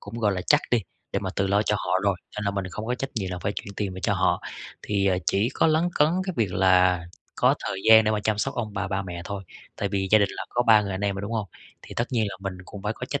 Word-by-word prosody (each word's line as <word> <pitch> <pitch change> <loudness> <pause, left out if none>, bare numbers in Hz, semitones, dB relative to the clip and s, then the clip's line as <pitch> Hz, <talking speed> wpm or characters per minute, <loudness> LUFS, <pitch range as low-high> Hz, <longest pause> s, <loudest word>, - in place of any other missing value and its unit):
cũng 100 +2 -10
gọi 105 -3 +2
là 90 - -2
chắc - - +5
đi, 120 - +4 0.3
để - - +1
mà - - -3
tự 100 - +1
lo 100 +2 +3
cho 105 0 +1
họ 90 +1 0
rồi, 100 -2 +2 0.2
nên 105 - -2
là 100 - +1
mình 100 -1 -3
không 105 +5 -6
có 125 - 0
trách 135 +2 -4
nhiệm 95 -4 -2
là 90 - -4
phải 100 +4 -2
chuyển 100 0 -7
tiền 100 -3 -2
về 95 - -7
cho - - +1
họ. - - +2 0.4
Thì 100 -1 +1 0.2
chỉ 105 +4 +2
có - - +3
lấn 160 +2 +3
cấn 150 +1 +4 0.2
cái 185 - -1
việc 105 -6 0
là 90 -1 +4 0.4
có - - +4
thời 95 - -3
gian 110 0 +9
để 110 - +2
mà 105 -1 0
chăm 110 -1 +1
sóc 135 +5 -1
ông 110 -4 -3
bà, 100 -2 -2
ba 95 0 -1
mẹ 85 -2 -6
thôi. 100 0 -5 0.3
Tại 100 - -1
vì 95 -1 -1
gia 110 - +7
đình 100 -2 +3
là - - -5
có 120 - +1
3 110 -3 +6
người 100 - -4
anh 95 - -4
em 100 -1 0
rồi, 95 - -5
đúng 105 +3 -4
hông? 110 -4 -2 0.3
Thì - - -10
tất 120 - 0
nhiên 110 -3 +2
là 100 - -7
mình 95 -2 -5
cũng 100 +1 -10
phải 105 +2 -1
có 125 - -7
trách 140 - -2
100 Hz, 310 wpm, -25 LUFS, 95-110 Hz, 0.4 s, gian